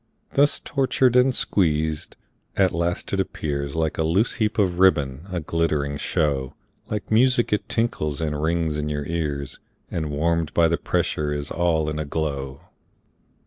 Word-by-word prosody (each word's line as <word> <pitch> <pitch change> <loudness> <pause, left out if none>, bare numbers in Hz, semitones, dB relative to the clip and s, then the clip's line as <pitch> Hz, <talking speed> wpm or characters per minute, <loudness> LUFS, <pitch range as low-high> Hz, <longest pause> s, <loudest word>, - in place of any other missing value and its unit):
Thus 145 +1 +4
tortured 130 -2 +1
and 125 +1 +5
squeezed, 80 -4 0 0.4
at 95 -2 +4
last 85 +3 -2
it 100 - +1
appears 70 -6 -3
Like 80 -1 -1
a - - +3
loose 90 +9 +2
heap 110 0 +1
of 90 -4 +1
ribbon, 75 -4 +3
a 90 - -1
glittering 75 -3 -1
show, 70 -2 -1 0.3
Like 105 -1 -4
music 120 0 +3
it 105 - -1
tinkles 75 -11 -1
and 75 -2 -2
rings 80 -1 0
in 75 0 -2
your 75 -1 -3
ears, 75 -4 -3 0.3
And 80 -2 -2
warm'd 80 +2 0
by 85 -1 +5
the 85 - +1
pressure 75 -1 -1
is 75 0 -3
all 80 -3 +1
in 75 0 -2
a 75 - -2
glow. 70 -3 -3
80 Hz, 160 wpm, -23 LUFS, 75-95 Hz, 0.4 s, and